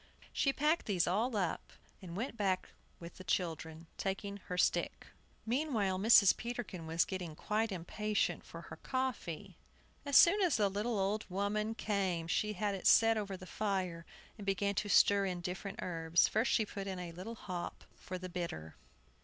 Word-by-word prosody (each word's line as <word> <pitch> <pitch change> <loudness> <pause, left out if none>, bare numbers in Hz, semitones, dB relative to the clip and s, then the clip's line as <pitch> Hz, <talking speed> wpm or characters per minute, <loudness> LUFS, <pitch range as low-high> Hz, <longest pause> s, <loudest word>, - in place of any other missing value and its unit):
She 275 - +2
packed 300 +3 +1
these 185 -5 +2
all 215 +6 0
up, 185 -4 -2 0.3
and 185 - -9
then 170 - -7
went 230 +5 -3
back 195 -4 0 0.3
with 170 0 -10
the 185 - -9
children, 165 -3 -2
taking 200 +1 -3
her 180 - -4
stick. - - +1 0.4
Meanwhile 225 -7 0
Mrs. 205 -2 +7
Peterkin 235 -8 -5
was 165 +1 +2
getting 180 -5 -5
quite 215 +5 -1
impatient 205 +4 -1
for - - -10
her - - -10
coffee. 255 - -3 0.5
As 285 -1 +4
soon 395 +5 +7
as 355 -9 +3
the 205 -2 +3
little 210 +4 -1
old 200 +2 0
woman 210 +3 -1
came 190 -7 -1
she 210 +5 0
had 205 +1 -1
it 195 - -1
set 225 0 +6
over 200 -3 -3
the 185 - -10
fire, 185 -4 -2 0.4
and 205 - -7
began 200 +1 +1
to 205 +1 -2
stir 200 0 +5
in 180 -1 -2
the 175 - -9
different 185 +2 -5
herbs. 165 -1 +2
First 220 +3 +1
she 220 - +3
put 200 -1 -6
in 190 -1 -3
a 180 -1 -5
little 185 +7 -7
hop 180 -5 -6
for 185 - -6
the 185 0 -6
bitter. 170 - -5
195 Hz, 180 wpm, -34 LUFS, 180-215 Hz, 0.5 s, Mrs